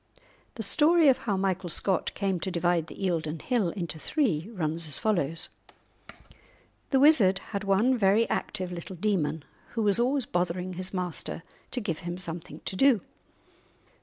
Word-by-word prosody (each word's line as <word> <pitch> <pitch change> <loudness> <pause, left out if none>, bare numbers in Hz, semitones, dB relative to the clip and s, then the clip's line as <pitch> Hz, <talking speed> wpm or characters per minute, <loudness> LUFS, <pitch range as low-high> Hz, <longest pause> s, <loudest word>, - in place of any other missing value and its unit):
The 225 - -3
story 315 - +5
of 260 - +3
how 200 - +1
Michael 190 -2 -1
Scott 185 +2 +1
came 195 -3 -1
to 190 - -3
divide 175 -2 0
the - - -10
Eildon 165 -3 -1
Hill 235 - 0
into 170 -3 -5
three 205 - 0
runs 165 -4 -2
as 150 - -3
follows:— 170 -7 +1 1.4
The 270 - +3
wizard 250 -10 +6 0.2
had 200 0 -2
one 200 +6 +3
very 205 +3 +4
active 185 -1 -2
little 175 +2 -7
demon, 165 -6 -1 0.3
who 225 - -1
was 205 +1 +4
always 260 +1 +1
bothering 180 0 -2
his 185 +1 -5
master 180 -3 -4 0.3
to 250 - -1
give 180 -9 -3
him 175 0 -5
something 170 -2 -5
to - - -3
do. 255 -1 +4
190 Hz, 160 wpm, -28 LUFS, 170-220 Hz, 1.4 s, wizard